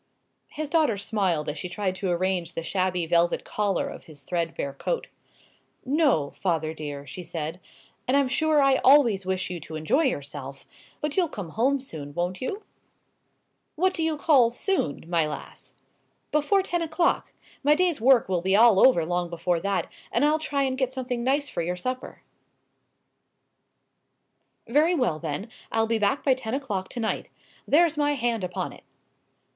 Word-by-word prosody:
His 310 0 -5
daughter 300 -8 +2
smiled 190 -7 0
as 150 0 -3
she 180 - -5
tried 185 +1 -2
to 190 0 -2
arrange 180 -1 -1
the 165 - -3
shabby 180 0 0
velvet 170 +1 +2
collar 205 -3 -1
of - - -9
his 145 -3 -13
threadbare 165 -3 -2
coat. - - -2 0.8
"No, 270 - +2
father 160 -4 -1
dear," 145 -2 -6
she 145 +6 -7
said; 165 0 -5 0.5
"and 260 +3 +3
I'm 280 -2 +3
sure 300 +2 +2
I 270 -1 +4
always 240 -10 +4
wish 185 -1 -1
you 175 - -4
to 155 +1 -9
enjoy 155 - +1
yourself. 140 - -4 0.4
But 300 -1 -2
you'll 355 -4 +2
come 195 - -6
home 265 +10 +1
soon, 150 - -8
won't 175 +2 -2
you?" 400 +11 -4 1.1
"What 370 +4 +2
do 330 - -3
you 320 -1 0
call 280 -6 +5
'soon,' 240 - -2
my 165 -3 +2
lass?" 150 - -9 0.6
"Before 305 +7 +2
ten 350 -2 -1
o'clock. 330 +1 0 0.3
My 295 +2 +5
day's 345 -6 +1
work 255 -1 +5
will 180 -2 0
be 190 +2 +2
all 220 -2 +6
over 185 -11 +5
long 175 +1 -1
before 170 0 -1
that, 200 +2 -1 0.3
and - - +2
I'll 305 +1 +3
try 285 -3 -1
and 260 -1 -1
get 260 -1 0
something 250 -2 -3
nice 280 +3 +1
for - - -3
your 175 +2 -2
supper." 255 +8 -5 2.4
"Very 305 +8 +3
well, 235 - 0
then, 160 +6 -4 0.2
I'll 225 0 +2
be 225 0 0
back 215 +7 +1
by 270 - +4
ten 255 -2 -4
o'clock 210 -9 -3
to - - -6
night. 220 -1 -2 0.4
There's 325 +1 +4
my 290 0 +2
hand 235 -5 -1
upon 180 -1 -3
it." - - -16
215 Hz, 170 wpm, -26 LUFS, 170-280 Hz, 2.4 s, all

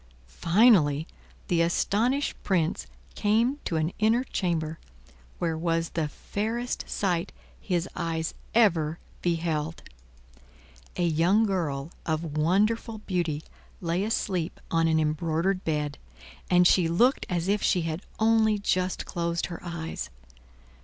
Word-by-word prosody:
Finally, 165 - +4 0.4
the 170 -2 +2
astonished 225 +11 +1
Prince 165 - 0 0.3
came 230 +7 +2
to 165 - -2
an 160 +2 0
inner 225 +3 +3
chamber, 165 -9 -2 0.6
where 165 -2 -1
was 165 0 0
the 160 -2 -1
fairest 225 - -3
sight 180 -2 -1 0.3
his 180 -2 -1
eyes 160 -1 -2 0.2
ever 165 -9 +3 0.2
beheld. 165 -2 -1 1.1
A 175 - +1
young 170 +7 +3
girl 160 -7 -2
of 160 -1 -2
wonderful 210 +8 +1
beauty 170 -5 -1 0.4
lay 175 +2 -1
asleep 185 -5 -1
on 165 0 +3
an 160 -1 +3
embroidered 165 +4 0
bed, 150 -2 -2 0.5
and 180 0 +5
she 180 -1 +5
looked 235 +11 +2
as 175 -1 -1
if 205 +1 +2
she 180 -4 +2
had 165 +1 -3 0.2
only 220 -1 +3
just 185 -2 0
closed 170 0 -2
her 170 - -6
eyes. 170 -2 -5
170 Hz, 120 wpm, -27 LUFS, 160-200 Hz, 1.1 s, and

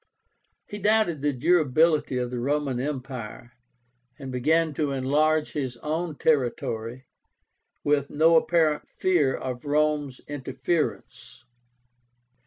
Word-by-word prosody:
He 205 - -8
doubted 210 -7 +2
the 145 0 +1
durability 155 0 +2
of 125 -1 -2
the 125 - -3
Roman 140 0 -1
Empire, 125 -4 -6 0.7
and 135 -3 -7
began 155 +5 +1
to 150 0 -1
enlarge 150 +4 +1
his 130 -5 -4
own 160 +1 -2
territory, 125 -4 -1 0.8
with 145 -1 +1
no 160 +3 +4
apparent 160 -2 +2
fear 160 -8 +1
of 125 -2 -5
Rome's 150 -2 0
interference. 145 +3 -4
145 Hz, 105 wpm, -25 LUFS, 130-155 Hz, 0.8 s, no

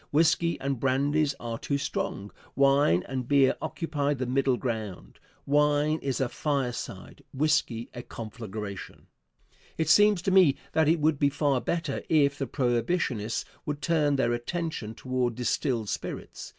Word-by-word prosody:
Whisky 165 +2 +2
and 135 -2 -2
brandies 140 +3 +1
are 115 -1 -5
too 140 - -1
strong; 100 -7 -3 0.2
wine 135 - +4
and 130 -2 -4
beer 140 -2 +4
occupy 145 -3 -1
the 130 -1 -3
middle 130 0 +1
ground. 105 - -5 0.3
Wine 150 +2 +2
is 135 -2 -2
a 130 - +1
fireside, 135 -3 -3
whisky 130 -5 +1
a 120 - -6
conflagration. 110 -4 -7 0.7
It 160 -1 0
seems 205 0 +5
to 190 - +1
me 185 -7 +6 0.2
that 160 -1 +3
it 165 +1 +3
would 150 -1 +2
be 140 - +4
far 140 -2 +1
better 165 -5 -2
if 145 -2 +3
the 135 - -2
Prohibitionists 120 - -1 0.2
would 145 -1 -2
turn 150 -4 +2
their 125 -3 +1
attention 120 -3 -4
toward 125 -2 -1
distilled 125 -2 -1
spirits. - - -5
140 Hz, 145 wpm, -27 LUFS, 120-150 Hz, 0.7 s, me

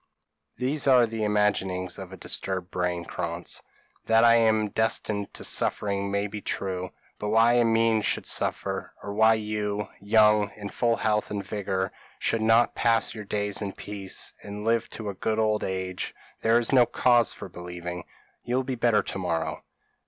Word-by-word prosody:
p> 125 - -3
"These 145 +2 +1
are 125 -3 +6
the 115 -1 -4
imaginings 100 -3 0
of 95 -1 -8
a 95 - -9
disturbed 95 0 -3
brain, 90 -1 -2
Krantz; - - -4 0.5
that 115 0 +5
I 115 0 +7
am 110 -2 +3
destined 105 -2 -1
to - - -6
suffering 100 -1 0
may 100 0 0
be 105 0 -6
true; 95 -2 -3 0.3
but 105 - -3
why 115 +3 +5
Amine 115 -1 +3
should - - 0
suffer, - - -2
or 100 - -5
why 110 +1 +5
you, 105 -1 -3
young, 105 0 +4
in 105 -1 -7
full 115 +3 +1
health 105 -1 0
and 100 -2 -4
vigour 95 -2 -2 0.3
should 115 - 0
not 115 +2 +4
pass 115 -1 +2
your 105 -2 -8
days 105 0 -1
in 100 -2 -3
peace, 100 -2 -4
and 105 +1 -7
live 115 0 +1
to 110 - -7
a - - -4
good 110 +3 -2
old 110 -1 +1
age, 95 -1 -3 0.3
there 115 +1 +4
is 120 +2 0
no 125 -3 +6
cause 120 -1 +3
for - - -8
believing. 90 -1 -7 0.4
You 120 - -2
will 130 - +1
be 130 - -3
better 115 -3 +2
tomorrow." 85 -4 -3
105 Hz, 175 wpm, -26 LUFS, 95-115 Hz, 0.5 s, I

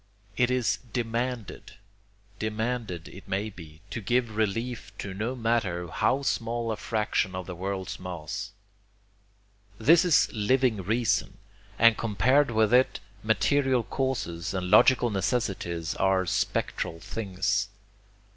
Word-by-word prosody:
It 125 -1 +2
is 125 -3 +1
DEMANDED, 120 -1 -3 0.7
demanded, 110 -5 -3
it 95 - -13
may 100 +3 -2
be, 80 -4 -13
to 115 - -4
give 120 +1 0
relief 110 0 -2
to 100 - -5
no 110 +6 -3
matter 110 -8 -1
how 135 +11 +1
small 115 -3 -1
a - - -1
fraction 105 -4 -1
of 95 -1 -4
the 90 - -6
world's 95 +1 -4
mass. 90 +2 -5 1.3
This 160 - +5
is 175 -5 +4
living 120 +2 +2
reason, 110 +5 0 0.4
and 115 -1 +5
compared 125 +7 +3
with 110 0 +2
it 130 +1 +4 0.2
material 125 +4 +2
causes 105 -11 -2
and 90 -1 -2
logical 125 -3 +6
necessities 95 -6 -1
are 95 -1 +2
spectral 80 -1 -1
things. 95 0 -1
110 Hz, 120 wpm, -27 LUFS, 95-125 Hz, 1.3 s, logical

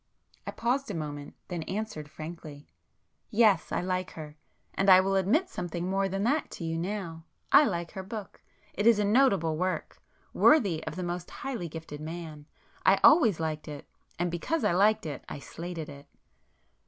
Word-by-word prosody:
I - - -2
paused 255 +3 -1
a 200 - -3
moment, 145 -2 -6
then 175 -2 -3
answered 195 -7 -4
frankly, 155 -2 -9 0.6
"Yes. 215 -3 +3
I - - 0
like 185 0 -2
her. 150 -2 -9 0.4
And 195 0 +1
I 185 -1 +9
will 195 +1 +1
admit 215 - +2
something 175 - -4
more 195 +1 0
than 195 +1 -2
that 285 +6 +1
to - - -7
you 165 0 -2
now. 170 -3 -4 0.3
I 295 - +8
like 170 -7 -2
her 190 - -6
book. 200 +1 -8 0.3
It 205 +3 0
is 230 -2 +7
a 210 - +1
noble 200 - +3
work,—worthy 185 - +1
of - - -4
the 185 - -4
most 175 0 -4
highly 235 -11 -5
gifted 155 -2 -8
man. 155 -2 -7 0.4
I 195 - +5
always 245 - +6
liked 155 -1 -3
it—and 160 +3 -6
because 285 - -2
I - - +3
liked 210 +4 +3
it, 145 -4 -5
I - - -5
slated 165 +2 -7
it." 140 -1 -12
180 Hz, 170 wpm, -29 LUFS, 160-205 Hz, 0.6 s, I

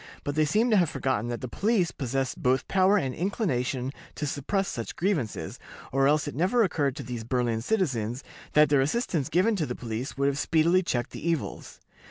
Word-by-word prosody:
But 145 - -2
they 155 +1 +3
seem 220 +10 +2
to 215 - +5
have 175 -5 +3
forgotten 125 -4 -1
that 120 - -4
the 130 - -4
police 195 - +1
possessed 135 -1 -2
both 130 +1 +2
power 190 +2 +4
and 135 -9 -1
inclination 135 - -1 0.2
to 150 - -3
suppress 170 +8 -1
such 115 - -5
grievances, 145 - -2 0.3
or 135 +1 +3
else 150 +1 +2
it 145 - -4
never 205 +9 +2
occurred 145 -8 0
to - - -6
these 120 -3 -5
"Berlin 120 -1 0
citizens" 125 - -1 0.3
that 150 -1 +6
their 145 -2 +4
assistance 155 - 0
given 190 +7 +3
to 155 -5 -1
the 125 - -4
police 120 +3 -5
would 140 - +1
have 140 0 +1
speedily 165 +4 +3
checked 120 -9 -2
the 170 - -4
evils. 165 -3 -3
145 Hz, 200 wpm, -27 LUFS, 125-180 Hz, 0.3 s, that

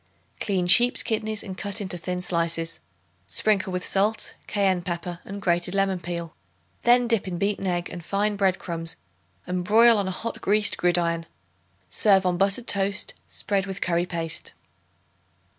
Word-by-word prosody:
Clean 190 -4 0
sheep's 240 +8 +5
kidneys 220 -1 -1
and 190 -2 -7
cut 200 0 -3
into 190 -3 -1
thin 180 +1 -4
slices. 170 -2 0 0.5
Sprinkle 200 -3 +1
with 180 0 -3
salt, 210 +3 +1
cayenne 195 -3 +1
pepper 175 0 -5
and 200 +1 -7
grated 175 -1 0
lemon 195 -2 +1
peel. 170 -1 -5 0.5
Then 245 0 +4
dip 230 -5 0
in 180 -2 -3
beaten 200 +1 -1
egg 175 -1 -1
and 175 - -7
fine 205 +4 0
bread 190 -2 +2
crumbs 165 -1 -5 0.5
and 180 0 -2
broil 225 +3 +6
on 200 - -1
a 190 - -4
hot 230 - -4
greased 205 0 +2
gridiron. 170 -1 0 0.6
Serve 195 -4 +4
on 180 -1 +1
buttered 200 +5 +1
toast, 200 -1 0 0.2
spread 200 -1 -1
with 190 -1 -5
curry 175 0 0
paste. 165 -2 -4
190 Hz, 160 wpm, -25 LUFS, 175-205 Hz, 0.6 s, broil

